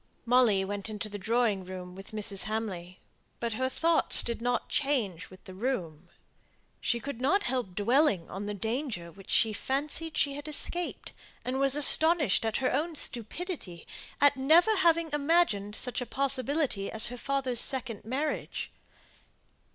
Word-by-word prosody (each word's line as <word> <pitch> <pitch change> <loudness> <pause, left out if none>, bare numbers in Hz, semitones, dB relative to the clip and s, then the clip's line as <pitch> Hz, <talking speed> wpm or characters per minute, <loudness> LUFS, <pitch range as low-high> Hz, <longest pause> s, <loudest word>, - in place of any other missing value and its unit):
Molly 230 -6 +3
went 205 +2 -5
into 215 0 -5
the 205 0 -7
drawing 220 -2 0
room 180 -1 -9
with 195 +1 -11
Mrs. 205 -2 -3
Hamley, 195 -5 -5 0.4
but 235 -1 -3
her 260 +4 -1
thoughts 330 +4 +3
did 235 -1 -4
not 245 +1 -1
change 240 - -1
with 185 0 -16
the 190 - -11
room. 185 - -4 0.7
She 235 - -1
could 250 -1 -7
not 390 +10 +2
help 245 -9 -2
dwelling 210 - +2
on 200 +2 -7
the 210 - -4
danger 220 - -4
which 195 +2 -16
she 220 -1 +2
fancied 295 +7 -2
she 280 - +1
had 290 +2 -8
escaped, 345 +3 -3 0.3
and 255 +1 -2
was 275 0 +4
astonished 295 - +7
at 220 - -1
her 260 - -1
own 315 +5 -2
stupidity 240 - -4 0.3
at 285 0 +4
never 325 +11 +4
having 335 -3 +2
imagined 285 - +1
such 250 +1 -3
a 250 - -5
possibility 275 -4 0
as 220 - +4
her 245 - -5
father's 270 -3 -2
second 250 -6 -3
marriage. 275 +7 -4
245 Hz, 155 wpm, -28 LUFS, 205-285 Hz, 0.7 s, astonished